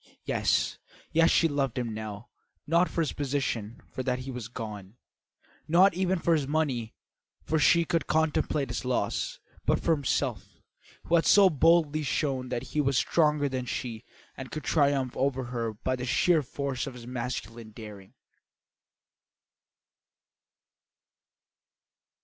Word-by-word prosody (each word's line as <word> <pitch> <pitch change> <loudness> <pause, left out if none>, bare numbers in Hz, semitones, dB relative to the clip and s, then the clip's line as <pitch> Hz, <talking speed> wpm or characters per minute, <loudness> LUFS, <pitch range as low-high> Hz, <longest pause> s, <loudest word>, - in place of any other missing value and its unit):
Yes, - - +1 0.3
yes, 165 +1 +4
she 165 - +4
loved 140 -4 -1
him 120 -3 -2
now; 110 +1 -7 0.4
not 170 +3 +3
for 170 - -1
his 155 - -1
position, 130 -6 -2
for - - -4
that 130 0 -2
was 125 -4 -5
gone; 105 -3 -8 0.7
not 180 +5 +5
even 185 +1 0
for 170 0 +2
his 150 -4 +1
money, 135 -7 -1 0.5
for 160 - 0
she 170 +3 +4
could 165 0 -1
contemplate 155 -4 +1
its 120 - -3
loss; 125 -1 -1 0.2
but - - +2
for - - 0
himself, 145 -5 -1 0.4
who - - -4
had 165 -1 +4
so 195 -2 +7
boldly 155 0 +3
shown 135 -2 -1
that 120 -1 -2
he 150 - +2
was 135 -2 +1
stronger 150 0 +2
than 130 -2 -3
she 115 -2 -4 0.3
and 130 -1 -8
could 155 - -6
triumph 140 -4 +1
over 130 -1 0
her 120 -2 -3
by 120 +5 -2
the 125 0 -5
sheer 165 +5 +3
force 140 -1 -4
of 130 - -7
his 120 -2 -10
masculine 120 -2 -5
daring. 105 -3 -11
135 Hz, 140 wpm, -28 LUFS, 120-155 Hz, 0.7 s, so